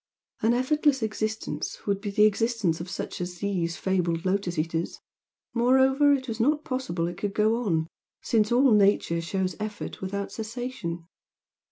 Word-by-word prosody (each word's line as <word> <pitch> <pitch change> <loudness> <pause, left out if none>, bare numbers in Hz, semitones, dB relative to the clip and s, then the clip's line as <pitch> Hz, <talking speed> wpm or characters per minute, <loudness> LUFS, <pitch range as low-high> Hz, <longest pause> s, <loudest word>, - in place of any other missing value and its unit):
An 230 +2 +3
effortless 270 0 +2
existence 220 0 -3
would 200 -1 0
be 205 - -3
the 210 +1 +4
existence 215 -6 +1
of 175 - -7
such - - -5
as 180 0 -4
these 175 -4 -1
fabled 175 -3 0
Lotus 185 -2 0
Eaters 165 +2 -2 0.5
moreover, 265 +4 +4
it 270 -2 +1
was 225 -1 -4
not 295 +6 +2
possible 220 -11 -2
it 175 0 -6
could 200 -1 -3
go 215 +1 +3
on, 170 -10 0 0.4
since 215 -1 +2
all 255 +2 +5
Nature 200 -5 +3
shows 185 +2 -2
effort 210 -1 -5
without 200 +1 -3
cessation. 220 -7 -5
210 Hz, 155 wpm, -27 LUFS, 180-240 Hz, 0.5 s, all